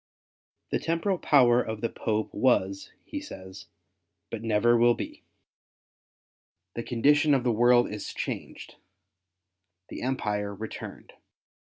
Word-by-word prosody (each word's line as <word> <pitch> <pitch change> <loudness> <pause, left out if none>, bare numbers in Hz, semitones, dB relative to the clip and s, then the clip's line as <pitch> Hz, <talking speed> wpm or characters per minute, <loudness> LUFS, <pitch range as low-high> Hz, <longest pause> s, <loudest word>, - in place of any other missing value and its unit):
The - - +1
temporal 170 +3 -1
power 125 -4 +5
of 110 -2 -5
the 115 - +1
Popes 110 -1 -2
was, 100 -6 +1
he 295 - -5
says, 95 - -10 0.6
but 115 - -4
never 115 +1 +3
will 120 0 +4
be. - - -7 1.5
The 115 - -4
condition 145 +5 +3
of 130 - 0
the 125 - +2
world 120 +2 +4
is 105 0 -6
changed - - -6 0.5
— 90 +1 -57
the - - -7
Empire 105 -6 -2
returned. 110 +3 -8
115 Hz, 125 wpm, -27 LUFS, 105-125 Hz, 1.5 s, power